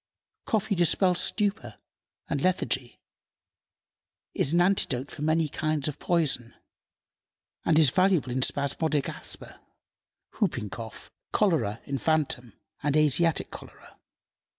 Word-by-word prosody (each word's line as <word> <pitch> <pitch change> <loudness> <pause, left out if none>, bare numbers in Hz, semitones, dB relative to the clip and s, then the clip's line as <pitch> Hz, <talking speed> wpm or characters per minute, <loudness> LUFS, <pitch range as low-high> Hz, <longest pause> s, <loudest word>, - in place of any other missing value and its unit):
Coffee 215 -1 0
dispels 180 0 +3
stupor 200 - 0 0.5
and 140 - -2
lethargy, 135 -8 -1 1.3
is 135 - +2
an 170 - +3
antidote 160 -8 +1
for 150 - -9
many 155 +1 +2
kinds 155 -1 -1
of 150 -1 -5
poison, 145 -9 0 1.1
and 160 - +3
is 155 -6 +6
valuable 185 -7 +2
in 130 +1 -1
spasmodic 145 +2 +1
asthma, - - -7 0.7
hooping 105 -2 -2
cough, 115 -1 -9 0.2
cholera 125 - +1
infantum, 140 -4 -1 0.3
and 145 +1 +1
Asiatic 155 +2 +2
cholera. - - -13
155 Hz, 105 wpm, -27 LUFS, 130-175 Hz, 1.3 s, is